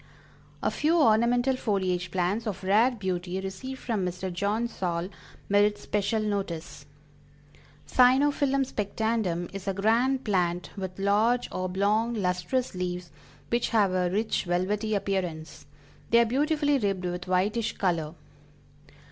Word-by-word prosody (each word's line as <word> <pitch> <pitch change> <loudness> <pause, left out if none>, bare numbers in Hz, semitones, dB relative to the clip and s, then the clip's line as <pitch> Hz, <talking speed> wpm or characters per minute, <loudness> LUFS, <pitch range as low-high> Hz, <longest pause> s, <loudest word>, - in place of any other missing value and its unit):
A - - +1
few 320 +3 +2
ornamental 245 +1 +3
foliage 185 -6 -1
plants 190 +5 -1
of 195 -3 -4
rare 210 +6 +4
beauty 185 -5 -3
received 195 +8 -6
from 220 -6 -1
Mr. 180 +1 -3
John 205 +6 0
Saul 175 -5 -3 0.4
merit 205 +1 +3
special 210 +2 -1
notice: 175 -8 -4 1.0
Cyanaphyllum 270 +2 +3
Spectandum 210 -6 -1
is 195 0 -7
a 195 - 0
grand 240 +6 +2
plant 180 -4 0
with 190 -2 -6
large, 210 +5 +2
oblong, 200 +5 0
lustrous 185 +6 -1
leaves 180 -1 -4 0.4
which 235 0 0
have 210 -5 +3
a 180 -1 +1
rich, 215 +3 -1
velvety 205 +5 0
appearance; 180 -5 -3 0.4
they 235 - +5
are 235 - +6
beautifully 290 +3 +1
ribbed 195 -4 -1
with 180 0 -4
whitish 205 +5 0
color. 170 -4 -1
200 Hz, 125 wpm, -27 LUFS, 180-235 Hz, 1.0 s, are